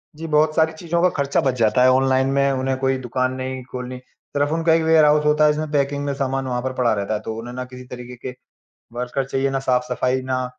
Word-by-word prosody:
जी, 165 Hz, +1 st, -7 dB
बहुत 155 Hz, 0 st, +2 dB
सारी 160 Hz, 0 st, +3 dB
चीज़ों 170 Hz, +1 st, -2 dB
का 180 Hz, -, +5 dB
खर्चा 140 Hz, +3 st, +1 dB
बच 135 Hz, -4 st, +1 dB
जाता 110 Hz, +2 st, +3 dB
है 130 Hz, -, +6 dB
ऑनलाइन 130 Hz, 0 st, +3 dB
में, 140 Hz, 0 st, +2 dB
उन्हें 130 Hz, 0 st, -1 dB
कोई 135 Hz, 0 st, +1 dB
दुकान 130 Hz, +1 st, -1 dB
नहीं 130 Hz, 0 st, -5 dB
खोलनी, 125 Hz, 0 st, -5 dB
सिर्फ़ 145 Hz, +3 st, -4 dB
उनका 165 Hz, 0 st, +2 dB
एक 165 Hz, -, +3 dB
वेयरहाउस 150 Hz, -2 st, +4 dB
होता 150 Hz, 0 st, +4 dB
है 150 Hz, -, +5 dB
जिसमें 155 Hz, 0 st, -3 dB
पैकिंग 140 Hz, 0 st, 0 dB
में 140 Hz, -, -1 dB
सामान 135 Hz, -1 st, -2 dB
वहाँ 125 Hz, -1 st, -2 dB
पर 130 Hz, 0 st, -3 dB
पड़ा 120 Hz, -3 st, +1 dB
रहता 100 Hz, +1 st, -2 dB
है 105 Hz, -, -1 dB
तो 110 Hz, -, -4 dB
उन्हें 120 Hz, +2 st, -8 dB
ना 130 Hz, 0 st, -4 dB
किसी 125 Hz, 0 st, -11 dB
तरीके 125 Hz, 0 st, -9 dB
के 125 Hz, -1 st, -5 dB, 0.6 s
वर्कर 125 Hz, +2 st, -2 dB
चाहिए, 135 Hz, +1 st, -1 dB
ना 135 Hz, 0 st, -1 dB
साफ-सफाई, 125 Hz, +1 st, 0 dB
ना 130 Hz, -1 st, -2 dB
130 Hz, 240 wpm, -21 LUFS, 125-150 Hz, 0.6 s, है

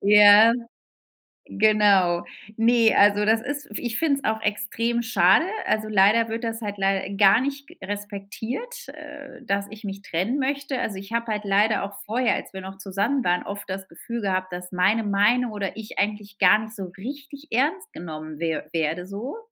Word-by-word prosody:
Ja, 210 Hz, +2 st, +7 dB, 0.9 s
genau. 200 Hz, -5 st, +3 dB, 0.3 s
Ne, 230 Hz, 0 st, +4 dB
also 205 Hz, +1 st, +4 dB
das 225 Hz, +1 st, +3 dB
ist 285 Hz, +3 st, -5 dB
f -, -, -4 dB
ich 240 Hz, -2 st, -3 dB
finde 290 Hz, -4 st, +1 dB
es -, -, -17 dB
auch 220 Hz, 0 st, 0 dB
extrem 230 Hz, +3 st, -1 dB
schade. 210 Hz, -, +4 dB, 0.2 s
Also, 215 Hz, 0 st, 0 dB
leider 215 Hz, +3 st, +4 dB
wird 225 Hz, +2 st, -4 dB
das 225 Hz, 0 st, -3 dB
halt 205 Hz, -1 st, -5 dB
leider 195 Hz, 0 st, 0 dB
gar 200 Hz, +3 st, +5 dB
nicht 280 Hz, +1 st, -4 dB
g -, -, -17 dB
respektiert, 205 Hz, -, -6 dB
äh, 290 Hz, -2 st, -11 dB
dass 200 Hz, -3 st, -1 dB
ich 215 Hz, +1 st, -12 dB
mich 195 Hz, 0 st, -6 dB
trennen 190 Hz, +11 st, -1 dB
möchte. 275 Hz, -1 st, -2 dB
Also, 200 Hz, -3 st, -3 dB
ich 195 Hz, +3 st, -10 dB
habe 235 Hz, 0 st, -1 dB
halt 210 Hz, 0 st, -4 dB
leider 205 Hz, +2 st, +2 dB
auch 200 Hz, 0 st, -6 dB
vorher, 240 Hz, +3 st, +1 dB
als -, -, -7 dB
wir 190 Hz, -, -7 dB
noch 190 Hz, +1 st, -9 dB
zusammen 200 Hz, +8 st, -1 dB
waren, 180 Hz, 0 st, +1 dB
oft 205 Hz, 0 st, -7 dB
das 190 Hz, 0 st, -5 dB
Gefühl 235 Hz, -1 st, -7 dB
gehabt, 185 Hz, -2 st, -2 dB
dass 180 Hz, +1 st, -7 dB
meine 190 Hz, +5 st, +2 dB
Meinung 215 Hz, +4 st, +2 dB
oder 200 Hz, -1 st, -4 dB
ich 220 Hz, -1 st, -9 dB
eigentlich 205 Hz, 0 st, -3 dB
gar 190 Hz, +2 st, +6 dB
nicht 220 Hz, 0 st, -8 dB
so 195 Hz, -3 st, -5 dB
richtig 280 Hz, +6 st, -9 dB
ernst 325 Hz, -, 0 dB
genommen 155 Hz, -2 st, -8 dB
wer 165 Hz, -2 st, -2 dB
werde 165 Hz, +2 st, -1 dB
so. 220 Hz, -, -6 dB
210 Hz, 185 wpm, -24 LUFS, 195-235 Hz, 0.9 s, Ja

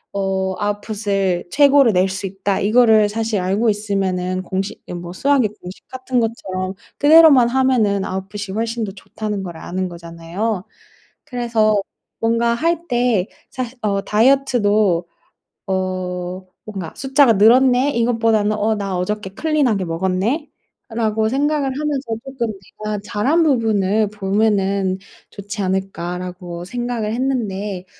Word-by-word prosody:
어 190 Hz, -1 st, -1 dB
아웃풋을 205 Hz, -3 st, -1 dB
최고로 280 Hz, 0 st, +5 dB
낼 185 Hz, -1 st, +3 dB
수 195 Hz, +1 st, -4 dB
있다.' 195 Hz, +1 st, -2 dB
이거를 220 Hz, 0 st, +4 dB
사실 220 Hz, -1 st, -1 dB
알고 195 Hz, +5 st, +1 dB
있으면은 190 Hz, -3 st, -2 dB
공식 190 Hz, +2 st, -3 dB
이 -, -, -6 dB
뭐 175 Hz, 0 st, -6 dB
수학의 265 Hz, +3 st, +2 dB
공식 180 Hz, +1 st, -11 dB
같은 255 Hz, -1 st, -2 dB
것처럼 190 Hz, -5 st, -3 dB, 0.3 s
그대로만 290 Hz, -5 st, +7 dB
하면은 240 Hz, -7 st, +2 dB
아웃풋이 195 Hz, +2 st, -5 dB
훨씬 225 Hz, +3 st, -2 dB
더 205 Hz, -, -3 dB
좋다는 210 Hz, +1 st, -5 dB
걸 175 Hz, -3 st, -7 dB
아는 185 Hz, +2 st, -4 dB
거잖아요. 170 Hz, +4 st, -4 dB, 0.6 s
그래서 225 Hz, -4 st, +1 dB, 0.4 s
뭔가 230 Hz, +1 st, +1 dB
할 335 Hz, +6 st, -1 dB
때 240 Hz, -6 st, +1 dB, 0.2 s
사실 255 Hz, -1 st, -5 dB
어 200 Hz, -2 st, 0 dB
다이어트도 215 Hz, -7 st, +2 dB, 0.6 s
어 185 Hz, -1 st, -3 dB, 0.2 s
뭔가 195 Hz, -6 st, -6 dB
'숫자가 270 Hz, -1 st, +4 dB
늘었네.' 250 Hz, +6 st, +5 dB
이것보다는 225 Hz, -3 st, +2 dB
'어 215 Hz, +1 st, +1 dB
나 200 Hz, -2 st, -3 dB
어저께 200 Hz, +2 st, -3 dB
클린 305 Hz, 0 st, +1 dB
하게 200 Hz, -5 st, 0 dB
먹었네.'라고 220 Hz, -, -2 dB
생각을 290 Hz, +3 st, +1 dB
하면서 290 Hz, -3 st, -2 dB, 0.2 s
쪼끔 260 Hz, -3 st, -3 dB, 0.4 s
'내가 215 Hz, -1 st, -2 dB
잘 210 Hz, 0 st, -3 dB
한 325 Hz, +5 st, +4 dB
부분을 220 Hz, -7 st, +2 dB
보면은 200 Hz, -2 st, 0 dB, 0.3 s
좋지 205 Hz, +1 st, -6 dB
않을까.'라고 180 Hz, -2 st, -4 dB
생각을 240 Hz, -1 st, -3 dB
했는데 210 Hz, -7 st, -2 dB
210 Hz, 290 characters per minute, -19 LUFS, 190-240 Hz, 0.6 s, 그대로만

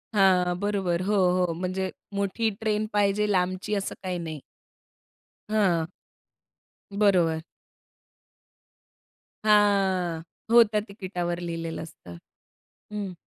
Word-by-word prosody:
हां, 180 Hz, -2 st, +4 dB
बरोबर, 195 Hz, -4 st, 0 dB
हो, 210 Hz, +1 st, +1 dB, 0.2 s
हो 180 Hz, -2 st, +1 dB
म्हणजे 185 Hz, +2 st, -2 dB, 0.3 s
मोठी 200 Hz, +3 st, 0 dB
ट्रेन 215 Hz, -1 st, 0 dB
पाहिजे 205 Hz, 0 st, +2 dB
लांबची 185 Hz, +2 st, 0 dB
असं 200 Hz, -1 st, -3 dB
काही 180 Hz, -1 st, -2 dB
नाही. 160 Hz, -3 st, -5 dB, 1.1 s
हां. 180 Hz, -6 st, +2 dB, 1.1 s
बरोबर. 175 Hz, -6 st, +3 dB, 2.0 s
हा. 195 Hz, -5 st, +3 dB, 0.3 s
हो, 235 Hz, 0 st, +9 dB
त्या 210 Hz, -1 st, -1 dB
तिकिटावर 180 Hz, -4 st, -4 dB
लिहिलेलं 165 Hz, -1 st, -4 dB
असतं. 90 Hz, -, -12 dB, 0.8 s
हं. 200 Hz, -3 st, -4 dB
185 Hz, 95 wpm, -26 LUFS, 175-205 Hz, 2.0 s, हो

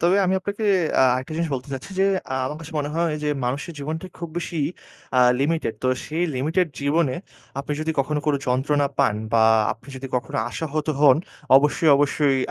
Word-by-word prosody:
তবে 175 Hz, +3 st, +3 dB
আমি 185 Hz, -, +2 dB
আপনাকে 200 Hz, +3 st, -4 dB, 0.4 s
আ -, -, +7 dB
আরেকটা 130 Hz, +4 st, -4 dB
জিনিস 165 Hz, -1 st, -1 dB
বলতে 130 Hz, +1 st, -6 dB
চাচ্ছি 135 Hz, -, -8 dB
যে, -, -, +5 dB, 0.3 s
আ -, -, 0 dB
আমার 150 Hz, -, -4 dB
কাছে 160 Hz, +1 st, -10 dB
মনে 145 Hz, 0 st, -2 dB
হয় 170 Hz, -2 st, +1 dB
যে 150 Hz, -, 0 dB, 0.2 s
মানুষের 140 Hz, +6 st, -3 dB
জীবনটা 155 Hz, +5 st, -4 dB
খুব 170 Hz, +1 st, -5 dB
বেশি 175 Hz, -, -5 dB, 0.6 s
আ -, -, +5 dB, 0.2 s
limited। 150 Hz, -5 st, 0 dB
তো 130 Hz, -, +1 dB, 0.2 s
সেই 160 Hz, +3 st, -2 dB
limited 160 Hz, +8 st, +1 dB
জীবনে 140 Hz, -1 st, +1 dB, 0.4 s
আপনি 140 Hz, +2 st, -3 dB
যদি 155 Hz, +1 st, -1 dB
কখনো 150 Hz, +2 st, 0 dB
কোনো 150 Hz, -2 st, +3 dB
যন্ত্রণা 140 Hz, +3 st, +1 dB
পান 105 Hz, -, +3 dB, 0.2 s
বা 115 Hz, -1 st, +5 dB, 0.3 s
আপনি 120 Hz, +4 st, -16 dB
যদি 135 Hz, +1 st, -6 dB
কখনো 140 Hz, +3 st, -4 dB
আশাহত 155 Hz, -1 st, -3 dB
হন, 140 Hz, -3 st, +7 dB, 0.4 s
অবশ্যই, 150 Hz, +3 st, +3 dB
অবশ্যই 145 Hz, -1 st, +2 dB
150 Hz, 185 wpm, -23 LUFS, 135-165 Hz, 0.6 s, আ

